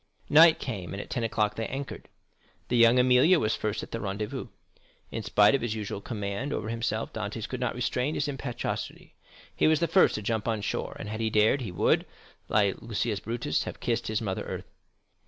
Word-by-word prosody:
Night 160 +2 +8
came, 95 -8 -5
and - - -5
at - - -8
ten 120 - -1
o'clock 110 -2 +1
they 115 - -3
anchored. 135 +1 -6 0.6
La 125 - +3
Jeune 120 +2 +4
Amélie 130 +8 +5
was 110 0 +1
first 105 0 -2
at - - -10
the 115 - -3
rendezvous. 105 +7 -4 0.6
In - - -3
spite 105 +4 +4
of 140 - +2
his 115 -2 -2
usual 105 -2 -4
command 105 +5 -4
over 110 -6 -3
himself, 115 0 -2
Dantès - - -4
could - - -5
not - - -1
restrain 125 +4 -1
his 145 - -1
impetuosity. 135 -4 -5 0.4
He - - +3
was 155 -1 +4
the 170 - +1
first 190 - +4
to 105 - -4
jump 110 +1 -1
on 110 -2 0
shore; - - -3
and - - -7
had 110 +1 -5
he 110 - +1
dared, 110 +5 +3
he 110 -7 -4
would, 90 - +2 0.4
like 100 -3 +2
Lucius 110 -1 -2
Brutus, 115 -9 -2
have - - -7
"kissed 120 -1 -1
his 110 +1 -1
mother 95 -3 -2
earth." - - -7
115 Hz, 205 wpm, -28 LUFS, 105-125 Hz, 0.6 s, Night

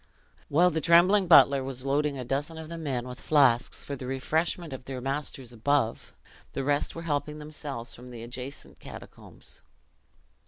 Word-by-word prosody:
While 175 +5 +4
the 160 0 -1
trembling 180 +5 +5
butler 140 -5 +7
was 130 -1 -6
loading 140 +1 0
a 125 - -5
dozen 145 +6 -2
of 160 -1 -8
the 170 - -6
men 130 -6 -3
with 125 -1 -8
flasks 130 -5 +3
for 140 - -5
the 130 -1 -7
refreshment 160 +4 -1
of 130 -1 -8
their 135 -1 -5
masters 135 -2 -4
above, 120 0 0 0.4
the 135 - -2
rest 145 +1 0
were 165 - -6
helping 150 -1 -2
themselves 145 -5 -6
from 125 +1 -12
the 120 -2 -9
adjacent 125 +3 -8
catacombs. - - -11
140 Hz, 165 wpm, -28 LUFS, 130-155 Hz, 0.4 s, butler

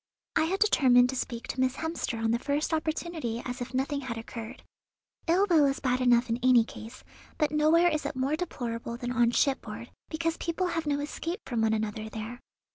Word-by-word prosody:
I 315 - +4
had 380 +4 -1
determined 255 -12 +5
to 265 - -3
speak 240 -2 -4
to - - -4
Miss 260 0 +2
Hemster 320 -7 -3
on 225 0 +1
the 235 - +1
first 290 +5 -1
opportunity 315 -6 -2
as 250 0 -5
if 245 0 -4
nothing 275 +2 -1
had 240 -4 -5
occurred. 225 +2 -8 0.6
Ill 360 +4 +4
will 315 -6 +5
is 275 - -1
bad 255 -1 0
enough 245 0 +4
in 230 +1 -1
any 250 -2 +6
case, 225 +1 -10 0.3
but 300 -3 +1
nowhere 310 +3 +4
is 305 -3 0
it 285 - -5
more 265 +4 0
deplorable 235 -8 -4
than 245 0 -4
on 240 -1 +3
shipboard, 270 +3 -1 0.2
because 330 +1 -1
people 335 +2 -1
have 330 -2 -2
no 285 0 +1
escape 335 +6 -4
from 235 -3 -1
one 220 0 +3
another 215 0 -2
there. 220 +3 -6
260 Hz, 200 wpm, -28 LUFS, 235-315 Hz, 0.6 s, any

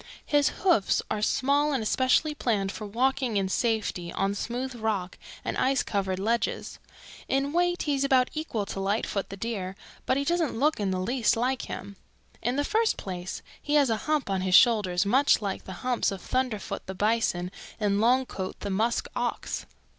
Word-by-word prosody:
His 290 -1 +3
hoofs 345 - +3
are 210 - -1
small 285 +6 +2
and 255 -5 0
especially 260 +7 +2
planned 205 -9 0
for 215 +1 -6
walking 250 +1 +1
in 195 -1 0
safety 210 -6 -1
on 195 +2 0
smooth 245 +5 -3
rock 215 -6 -2 0.3
and - - -2
ice 265 0 +2
covered 190 -2 -1
ledges. 220 +3 -1 0.5
In 275 +2 0
weight 350 +1 +1
he 295 - 0
is 275 0 +1
about 260 -2 +3
equal 305 -10 -2
to 195 - -5
Lightfoot 200 0 -1
the 195 - -7
Deer, 195 -3 -4 0.3
but 260 - +3
he 280 - +1
doesn't 330 -4 0
look 300 +3 +2
in 200 -2 0
the 185 -1 -1
least 230 +4 +1
like 250 +2 -1
him. 200 -1 -7 0.4
"In 245 +3 0
the 290 - +1
first 445 +8 +1
place 180 -1 -5 0.2
he 295 - 0
has 280 -5 +4
a 220 - +1
hump 305 -2 +1
on 195 -2 0
his 185 -1 +3
shoulders 205 -6 +5
much 265 +8 +4
like 200 -3 -4
the 190 - -7
humps 250 -2 +2
of 195 - -5
Thunderfoot 250 -2 -2
the 190 - -5
Bison 205 -4 +1 0.3
and 205 -1 +1
Longcoat 240 -5 0
the 200 - -3
Musk 220 +5 +1
Ox. - - -3
230 Hz, 185 wpm, -27 LUFS, 195-270 Hz, 0.5 s, shoulders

